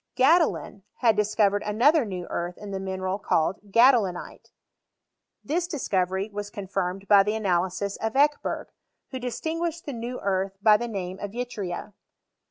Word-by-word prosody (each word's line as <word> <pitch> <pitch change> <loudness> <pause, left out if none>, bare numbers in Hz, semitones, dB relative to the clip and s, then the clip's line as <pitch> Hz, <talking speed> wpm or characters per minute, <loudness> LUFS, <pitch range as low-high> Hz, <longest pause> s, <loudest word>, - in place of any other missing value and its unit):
Gadolin 280 - +2 0.2
had 225 -3 +4
discovered 210 -1 +2
another 245 +8 +3
new 185 -4 -5
earth 175 +1 -3
in 205 -1 -8
the 195 - -3
mineral 190 0 -3
called 195 +2 -1
gadolinite. 230 -7 +3 0.9
This 340 +4 -1
discovery 195 - -1
was 205 0 -4
con 205 -1 -7
firmed 195 0 -3
by 200 -1 +7
the 210 +2 0
analysis 190 -1 -1
of 220 0 -2
Ekeherg, 290 +2 +1 0.4
who 260 - -4
distinguished 325 +7 -3
the 285 - -4
new 240 +2 -5
earth 195 0 -1
by 210 +1 +6
tlie 240 - -3
name 190 -3 -5
of 205 0 -6
yttria. 210 -6 -5
205 Hz, 150 wpm, -26 LUFS, 190-245 Hz, 0.9 s, by